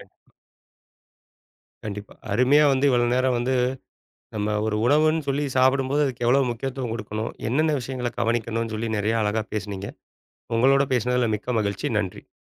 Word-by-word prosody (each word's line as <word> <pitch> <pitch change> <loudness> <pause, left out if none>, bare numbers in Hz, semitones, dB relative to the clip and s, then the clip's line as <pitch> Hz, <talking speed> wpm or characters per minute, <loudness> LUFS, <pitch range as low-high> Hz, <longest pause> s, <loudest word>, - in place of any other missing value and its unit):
ம். - - -21 1.5
கண்டிப்பா. 105 0 -7 0.2
அருமையா 140 +4 +4
வந்து 135 +2 +2
இவ்வளவு 120 -1 +2
நேரம் 130 -1 +2
வந்து 125 +2 0 0.8
நம்ம 105 0 -1
ஒரு 110 - -1
உணவுன்னு 155 +3 +3
சொல்லிச் 140 -1 -1
சாப்படும்போது 135 +2 +3
அதுக்கு 125 -3 -4
எவ்வளவு 130 +1 +3
முக்கியத்துவம் 125 -1 -4
கொடுக்கணும், 110 0 -4 0.2
என்னென்ன 155 +4 +2
விஷியங்களைக் 125 -1 -4
கவனிக்கணும்னு 115 -1 -1
சொல்லி 115 +1 -3
நிறைய 110 +2 0
அழகா 105 +1 0
பேசுனீங்க. 100 -1 -4 0.7
உங்களோட 135 +4 +4
பேசினதுல 125 0 +1
மிக்க 115 +3 -3
மகிழ்ச்சி. 100 -2 -2
நன்றி. 95 -3 -5
120 Hz, 135 wpm, -24 LUFS, 110-135 Hz, 1.5 s, அருமையா